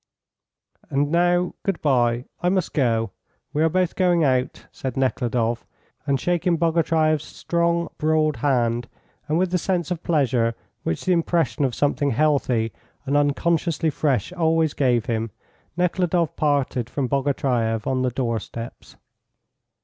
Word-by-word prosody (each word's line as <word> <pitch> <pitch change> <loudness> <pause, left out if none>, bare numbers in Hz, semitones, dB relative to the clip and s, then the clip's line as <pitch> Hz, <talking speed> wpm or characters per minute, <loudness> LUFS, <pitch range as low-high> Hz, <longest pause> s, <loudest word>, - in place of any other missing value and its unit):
"And 145 +2 0
now 175 +1 +2
good 195 -3 -2
bye; 120 -3 +2 0.2
I 180 - +2
must 185 -2 0
go. 115 -6 +1 0.4
We 150 - 0
are 160 - +4
both 185 +1 0
going 175 -3 +3
out," 130 -2 0
said 130 -2 -5
Nekhludoff, 120 -3 0 0.4
and 140 -1 +2
shaking 175 +1 +1
Bogatyreff's 160 -2 +2
strong, 170 0 -1
broad 155 -1 +2
hand, 120 -4 +1 0.4
and 155 +1 +1
with 180 0 +1
the 180 - +1
sense 180 0 -1
of 175 -2 -2
pleasure 130 -8 +1 0.3
which 80 - -3
the 185 - +3
impression 165 -7 +1
of 125 -3 -2
something 145 0 +1
healthy 130 -5 +1 0.3
and 140 +1 0
unconsciously 155 +2 +1
fresh 145 +3 0
always 160 -3 +2
gave 125 -5 +1
him, 115 -2 -1 0.5
Nekhludoff 175 -2 +1
parted 140 -5 0
from 135 -1 -2
Bogatyreff 125 -5 0
on 130 -1 0
the 130 - +1
door 120 -2 -1
steps. 115 +3 -9
145 Hz, 140 wpm, -23 LUFS, 125-170 Hz, 0.5 s, are